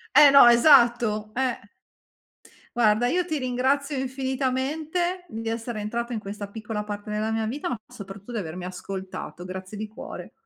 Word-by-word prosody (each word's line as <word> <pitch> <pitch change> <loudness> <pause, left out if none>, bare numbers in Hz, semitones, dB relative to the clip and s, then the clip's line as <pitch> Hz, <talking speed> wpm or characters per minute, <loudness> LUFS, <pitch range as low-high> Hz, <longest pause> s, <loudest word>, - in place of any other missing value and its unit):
Eh 290 -1 +9
no, 275 -3 +9
esatto 235 -4 +5
eh! 255 -1 0 1.2
Guarda, 225 0 +3
io 360 +5 +1
ti 315 -4 -2
ringrazio 270 +3 0
infinitamente 270 +7 -2
di 225 -2 -5
essere 230 -1 -3
entrato 235 +3 -3
in 225 - -1
questa 205 0 -7
piccola 210 0 -5
parte 205 0 -6
della 215 +1 -1
mia 220 0 -1
vita, 270 +7 -3
ma 245 - -1
soprattutto 200 +3 -10
di 230 - -2
avermi 175 0 -5
ascoltato. 185 -1 -7
Grazie 185 +2 -7
di 215 0 -4
cuore. 220 - -9
235 Hz, 155 wpm, -25 LUFS, 210-265 Hz, 1.2 s, Eh